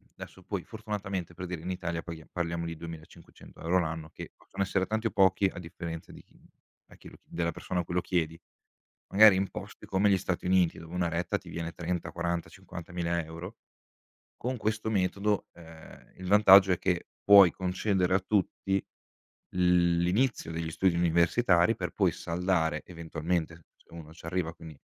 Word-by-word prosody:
desso 95 Hz, -, -11 dB
poi, 100 Hz, -2 st, -4 dB
fortunatamente, 100 Hz, -5 st, -5 dB
per 90 Hz, +1 st, -6 dB
dire, 85 Hz, -3 st, -5 dB
in 90 Hz, -, -3 dB
Italia, 85 Hz, -2 st, -3 dB
paghia 80 Hz, -2 st, -9 dB
parliamo 85 Hz, -1 st, -2 dB
di 85 Hz, -, -5 dB
2.500€ 80 Hz, +2 st, -5 dB
l'anno, 80 Hz, -2 st, -3 dB
che, -, -, -9 dB
possono -, -, -7 dB
essere 95 Hz, 0 st, +1 dB
tanti 110 Hz, +2 st, -1 dB
o -, -, -4 dB
pochi, 95 Hz, 0 st, +3 dB
a -, -, -13 dB
differenza 85 Hz, -1 st, -7 dB
di -, -, -12 dB
chi -, -, -26 dB, 0.5 s
a -, -, -15 dB
chi -, -, -13 dB
l -, -, -15 dB
della 85 Hz, 0 st, -2 dB
persona 90 Hz, -, -4 dB
a -, -, 0 dB
cui 85 Hz, -, -6 dB
lo 90 Hz, -, +2 dB
chiedi. 85 Hz, -3 st, -1 dB, 0.7 s
Magari, 105 Hz, -1 st, +8 dB
in 95 Hz, 0 st, 0 dB
posti -, -, -9 dB
come 100 Hz, +2 st, +2 dB
gli 95 Hz, -, +4 dB
Stati 90 Hz, -1 st, -3 dB
Uniti, 90 Hz, -2 st, +2 dB
dove 85 Hz, +1 st, -11 dB
1 90 Hz, -1 st, 0 dB
retta 85 Hz, +1 st, -1 dB
ti -, -, -15 dB
viene 85 Hz, 0 st, -4 dB
30, 90 Hz, 0 st, -3 dB
40, 85 Hz, -1 st, -2 dB
50.000€, 85 Hz, +1 st, -5 dB, 0.8 s
con 125 Hz, +2 st, -2 dB
questo 110 Hz, 0 st, -2 dB
metodo, 100 Hz, +1 st, 0 dB
ehm, 80 Hz, -2 st, -14 dB
il 95 Hz, -, -8 dB
vantaggio 95 Hz, -1 st, +7 dB
è 90 Hz, -, +1 dB
che, 90 Hz, -2 st, 0 dB, 0.3 s
puoi 100 Hz, -4 st, +9 dB
concedere 95 Hz, 0 st, 0 dB
a 95 Hz, -, +3 dB
tutti, 95 Hz, 0 st, 0 dB, 0.7 s
l 90 Hz, -1 st, +3 dB
l'inizio 100 Hz, +1 st, +1 dB
degli 80 Hz, 0 st, -3 dB
studi 90 Hz, +1 st, +2 dB
universitari, 85 Hz, +2 st, +3 dB
per -, -, -4 dB
poi -, -, +2 dB
saldare, 85 Hz, -3 st, 0 dB
eventualmente, 85 Hz, -1 st, -3 dB, 0.2 s
s -, -, -29 dB
se -, -, -18 dB
uno 80 Hz, -2 st, -10 dB
c'arriva 80 Hz, 0 st, -3 dB
quindi, 80 Hz, -4 st, -12 dB
90 Hz, 175 wpm, -29 LUFS, 85-95 Hz, 0.8 s, puoi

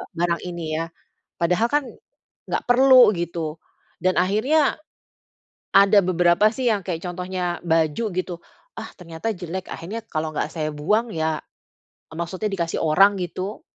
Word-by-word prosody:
barang 170 Hz, 0 st, 0 dB
ini 175 Hz, -2 st, -6 dB, 0.2 s
ya. 165 Hz, -, -2 dB, 0.5 s
Padahal 180 Hz, +7 st, +2 dB
kan, 295 Hz, +2 st, +1 dB, 0.7 s
enggak -, -, -1 dB
perlu." 255 Hz, -2 st, +7 dB
gitu 170 Hz, -3 st, -4 dB, 0.4 s
dan 185 Hz, 0 st, +2 dB
akhirnya, 255 Hz, +11 st, +2 dB, 1.0 s
ada 200 Hz, +1 st, +7 dB
beberapa 180 Hz, +4 st, +3 dB
sih 250 Hz, -1 st, 0 dB
yang 205 Hz, -4 st, -1 dB
kayak 165 Hz, -3 st, -3 dB
contohnya 180 Hz, 0 st, -3 dB
baju 160 Hz, +5 st, +1 dB
gitu, 180 Hz, -1 st, -3 dB, 0.4 s
"Ah -, -, -6 dB
ternyata 175 Hz, +5 st, -5 dB
jelek." 180 Hz, 0 st, -6 dB
akhirnya, 205 Hz, +7 st, -6 dB
kalau 155 Hz, 0 st, -3 dB
enggak -, -, -2 dB
saya 155 Hz, -2 st, -2 dB
buang 210 Hz, +11 st, +1 dB
ya 160 Hz, -3 st, -1 dB, 0.7 s
eee, -, -, -10 dB
maksudnya 185 Hz, +5 st, -3 dB
dikasih 170 Hz, -4 st, -2 dB
orang 195 Hz, +6 st, +5 dB
gitu. 185 Hz, -, -5 dB
180 Hz, 140 wpm, -23 LUFS, 165-210 Hz, 1.0 s, perlu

